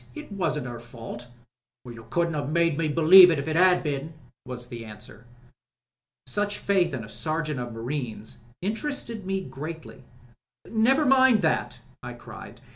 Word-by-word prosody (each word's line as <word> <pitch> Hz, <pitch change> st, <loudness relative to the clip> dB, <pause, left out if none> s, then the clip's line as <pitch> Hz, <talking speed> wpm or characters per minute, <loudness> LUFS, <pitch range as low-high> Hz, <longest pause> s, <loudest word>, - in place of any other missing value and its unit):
It -, -, -9 dB
wasn't 170 Hz, -8 st, -2 dB
her 120 Hz, -2 st, -6 dB
fault." 120 Hz, 0 st, -9 dB, 0.6 s
"You 115 Hz, -2 st, -11 dB
couldn't 170 Hz, -1 st, 0 dB
'aven't 145 Hz, -1 st, -3 dB
made 165 Hz, -1 st, +2 dB
me 165 Hz, +1 st, 0 dB
believe 170 Hz, +4 st, +8 dB
it 165 Hz, -, +1 dB
if 140 Hz, -, -4 dB
it 155 Hz, -, -1 dB
'ad 180 Hz, +1 st, +4 dB
been," 150 Hz, +1 st, -3 dB, 0.3 s
was 125 Hz, -1 st, -7 dB
the 120 Hz, -2 st, -8 dB
answer. 105 Hz, +1 st, -12 dB, 1.0 s
Such 205 Hz, +8 st, -2 dB
faith 195 Hz, -3 st, +1 dB
in 120 Hz, -, -5 dB
a -, -, -9 dB
Sergeant 155 Hz, +4 st, -3 dB
of 120 Hz, -1 st, -5 dB
Marines 115 Hz, -2 st, -5 dB, 0.2 s
interested 225 Hz, -1 st, -4 dB
me 195 Hz, 0 st, -1 dB
greatly. 150 Hz, -1 st, -8 dB, 0.6 s
"Never 260 Hz, +7 st, +2 dB
mind 260 Hz, -2 st, +5 dB
about -, -, -3 dB
that," 125 Hz, -6 st, 0 dB, 0.2 s
I 125 Hz, -, -7 dB
cried. 120 Hz, -, -12 dB
155 Hz, 160 wpm, -26 LUFS, 125-185 Hz, 1.0 s, believe